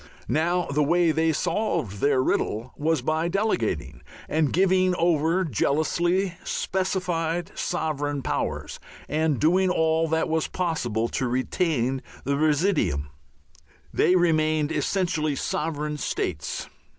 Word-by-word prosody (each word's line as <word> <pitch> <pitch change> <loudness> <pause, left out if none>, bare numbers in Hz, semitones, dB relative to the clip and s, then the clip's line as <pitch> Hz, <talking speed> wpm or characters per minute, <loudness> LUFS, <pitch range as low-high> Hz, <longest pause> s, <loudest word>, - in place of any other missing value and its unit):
Now 175 +3 +1
the 145 +2 0
way 170 +3 +3
they 160 +1 +2
solved 165 - -1
their 140 0 +3
riddle 115 0 -1
was 155 -3 0
by 155 +3 0
delegating 170 - -1 0.3
and 155 -2 +1
giving 185 0 +3
over 170 +1 +2
jealously 170 - +1
specified 180 -2 -1
sovereign 145 -5 -2
powers - - -3 0.3
and 155 -3 0
doing 180 +4 +3
all 160 -1 +2
that 160 0 +1
was 160 0 0
possible 120 -11 -1
to 130 - -1
retain 130 0 0 0.2
the 140 +2 0
residuum. 145 - +1 0.8
They 180 - +3
remained 155 -3 +2
essentially 160 -5 0
sovereign 150 +1 -2
states. 75 - -3
160 Hz, 115 wpm, -25 LUFS, 145-175 Hz, 0.8 s, way